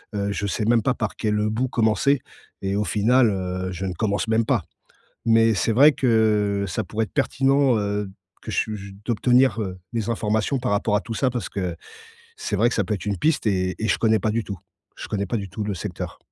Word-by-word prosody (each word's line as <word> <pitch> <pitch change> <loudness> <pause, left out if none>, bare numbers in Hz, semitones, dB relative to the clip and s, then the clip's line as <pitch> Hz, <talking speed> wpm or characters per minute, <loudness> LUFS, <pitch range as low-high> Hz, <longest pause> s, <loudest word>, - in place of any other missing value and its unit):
heu, 100 0 -1
je 100 - -3
sais 105 +2 -1
même 115 +1 +4
pas 130 - +2
par 110 -4 -3
quel, 105 -1 0
heu, 105 0 +1
bout 120 +4 0
commencer 120 +4 +2 0.4
et 95 0 -1
au 105 - +1
final, 115 +4 +3
heu, 90 -1 -3
je 95 +1 -4
ne 95 - -2
commence 100 +4 -1
même 110 0 +2
pas. - - +1 0.6
Mais 115 0 +4
c'est 110 +4 +1
vrai 140 +7 +7
que, 110 -6 +2
ça 110 +4 -2
pourrait 110 +4 -2
être 110 - -8
pertinent, 135 -1 +2
heu, 105 -1 -2 0.3
que - - -7
ch - - 0
j 100 0 -9
d'obtenir, 125 +1 +3
heu, 95 -3 -4 0.2
des 115 -1 -2
informations 110 +3 0
par 125 -2 -2
rapport 105 +1 +1
à 105 - +2
tout 115 - -6
ça. 130 +4 +1
Parce 120 -5 -4
que 90 -4 -3 0.6
c'est 105 - -3
vrai 115 +4 +3
que - - -3
ça 105 - +1
peut 105 +3 -1
être 95 - -8
une 100 -2 -1
piste 155 -5 +1
et 95 -3 0
et 110 - +1
je - - +2
connais 110 -1 +3
pas 110 +3 0
du 115 +1 -1
tout, 100 -2 -6 0.4
je - - -7
connais 100 -1 -2
pas 115 - -1
du 100 - -5
tout 105 +4 -4
le 105 -1 -3
secteur. - - -6
110 Hz, 235 wpm, -23 LUFS, 100-115 Hz, 0.6 s, vrai